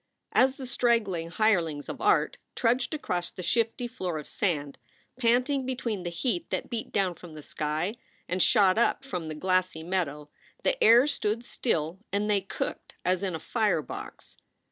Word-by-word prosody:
As 260 +1 +4
the 265 - -7
straggling 225 -9 +1
hirelings 170 -8 +1
of - - -6
art 415 +2 +3 0.2
trudged 245 +5 +1
across 180 - -2
the 185 - -8
shifty 230 +4 0
floor 185 -9 -3
of 150 - -7
sand, 145 -8 -1 0.4
panting 255 +3 +2
between 245 -6 -2
the 175 - -3
heat 255 - -2
that - - -3
beat 230 -2 -4
down 190 -3 +1
from 170 -1 -12
the 150 - -9
sky 155 +8 -2 0.3
and 185 +1 0
shot 200 -1 +5
up 270 +3 +2
from 180 -12 -4
the 155 - -4
glassy 185 -1 0
meadow, 150 -5 -2 0.3
the - - +2
air 235 +4 +8
stood 230 -5 -1
still 165 -8 -1
and 205 +1 +1
they 200 -1 +3
cooked 190 - -5
as 185 +1 +2
in 190 -4 -1
a - - -4
fire 205 -4 +1
box. - - -8
195 Hz, 170 wpm, -28 LUFS, 170-240 Hz, 0.4 s, air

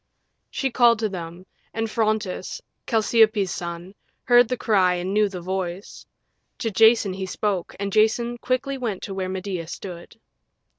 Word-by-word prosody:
She 270 -2 -2
called 235 -1 +5
to 215 -1 -1
them, 175 -1 -7 0.3
and 225 0 -1
Phrontis, 215 -3 -1 0.3
Chalciope's 220 -3 +3
son, 175 +2 -6 0.3
heard 245 -1 +5
the 250 - -1
cry 190 -6 +3
and 180 +2 -3
knew 210 0 +3
the 185 -2 -7
voice. 185 +1 -5 0.5
To 225 - -2
Jason 220 -1 +4
he 190 0 -5
spoke, 190 -1 -2
and 200 -1 -3
Jason 235 +2 +2
quickly 260 +2 -1
went 220 -7 -3
to 195 - -5
where 190 -1 -3
Medea 185 -3 -4
stood. 175 +3 -9
200 Hz, 150 wpm, -23 LUFS, 185-225 Hz, 0.5 s, called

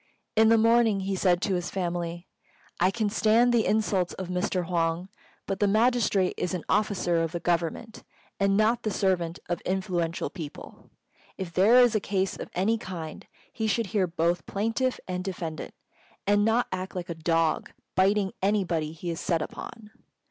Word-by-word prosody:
In 220 0 +5
the 230 - +6
morning 225 -2 +4
he 195 0 -2
said 180 -1 +2
to 200 - +1
his 175 -1 -2
family, 175 -2 -3 0.5
"I 180 - +4
can 215 +1 -1
stand 225 +3 +3
the 230 -2 +3
insults 200 -4 +1
of 185 -2 -6
Mr. 180 0 -1
Huang; 170 +1 -1 0.4
but 195 -1 -3
the 205 - +3
magistrate 215 -3 +2
is 180 +1 -1
an 175 - -5
officer 195 -5 +1
of 165 0 -2
the 170 - -2
Government, 175 +6 -2 0.4
and 195 0 +3
not 225 +2 +3
the 215 - -1
servant 180 -4 0
of 175 0 -2
influential 180 -3 -2
people. 160 -6 -9 0.5
If 180 -3 -5
there 200 +8 +5
is 245 -2 +6
a 215 - +2
case 195 -1 -1
of - - -7
any 215 +5 +1
kind, 170 -7 -7 0.3
he 220 -3 -2
should 225 +2 +1
hear 195 -4 +2
both 170 +1 -1
plaintiff 225 +5 -1
and 180 0 -3
defendant, 170 -4 -5 0.5
and 205 +1 +3
not 225 +3 +3
act 185 +1 -4
like 180 0 -5
a - - -2
dog, 165 0 0 0.2
biting 195 +2 +2
anybody 180 -6 0
he 170 +2 -5
is 165 - -5
set 165 -3 0
upon. 215 +6 -9
190 Hz, 175 wpm, -27 LUFS, 175-215 Hz, 0.5 s, the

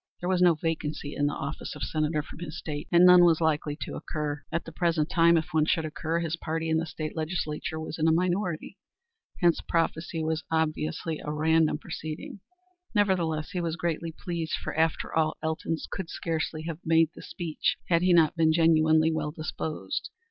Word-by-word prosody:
There 175 - -3
was 185 -1 +2
no 175 -2 +6
vacancy 155 -2 -3
in 145 - +1
the 145 - -2
office 140 +3 -5
of - - -6
Senator 155 -1 0
from 150 - -12
his 160 -3 -6
state, 145 -1 -5
and 175 0 +7
none 180 -1 +9
was 165 -2 +5
likely 150 -2 0
to - - -4
occur. 150 -2 -4
At 170 +1 -2
the 165 - -8
present 165 -2 0
time, 170 -1 +5
if 160 - -1
one 155 -1 +3
should 160 -1 +1
occur, 160 +2 -2
his 165 0 -1
party 165 0 -3
in 160 - +3
the 165 +1 -1
state 155 -1 -5
legislature 160 -1 -3
was 160 0 -6
in 160 - +3
a - - +5
minority. 180 0 -1 0.6
Hence 175 -2 +4
prophecy 165 -1 -1
was 160 0 -1
obviously 160 0 -1
a 150 - -3
random 160 +1 +2
proceeding. 155 +5 -7 0.6
Nevertheless 170 -7 +1
he 180 -2 -2
was 165 -1 -2
greatly 165 -1 -2
pleased, 165 -2 -4
for, - - -5
after 160 +1 0
all, 155 -1 +1
Elton 160 +1 -1 0.2
would 190 -4 -5
scarcely 160 -1 -3
have 165 -1 -5
made 165 0 +3
the - - -11
speech 165 -4 -2
had 170 -1 +4
he 180 0 +3
not 165 -2 +5
been 160 -1 +4
genuinely 160 -1 +4
well 155 -2 -1
disposed. 155 0 -4
160 Hz, 190 wpm, -28 LUFS, 155-170 Hz, 0.6 s, none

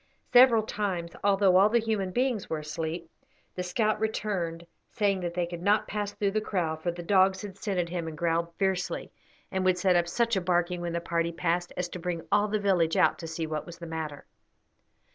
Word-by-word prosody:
Several 245 -3 +7
times, 190 -6 -3
although 195 -2 +4
all 200 +3 +6
the 235 - +3
human 220 -4 0
beings 245 0 -1
were 160 - -1
asleep, 160 +2 -4 0.5
the 180 - -4
scout 215 +4 0
returned, 190 -6 -2 0.2
saying 200 -4 +1
that 175 -1 -4
they 175 -1 +1
could 170 0 -7
not 205 +3 +2
pass 205 -1 -3
through 200 -1 -1
the 215 +1 0
kraal, 175 -7 -1
for 160 +3 -3
the 175 0 -5
dogs 190 +1 +3
had 200 -2 -7
scented 190 -4 -2
him 170 -2 -3
and 155 -1 -6
growled 170 +1 0
fiercely, 190 -2 -1 0.4
and 190 0 -1
would 185 -1 +3
set 180 0 +3
up 175 -1 +3
such 230 +5 +1
a 190 - +1
barking 175 0 0
when 170 -1 -3
the 170 - -1
party 170 0 -1
passed 175 +1 -1
as 180 - -1
to 180 - -7
bring 170 -1 -3
all 205 0 +4
the 215 +1 0
village 185 -6 +2
out - - +3
to 165 - -6
see 160 0 -3
what 155 -1 -4
was 170 -1 -9
the 170 - -8
matter. 160 -3 -5
180 Hz, 215 wpm, -28 LUFS, 170-205 Hz, 0.5 s, Several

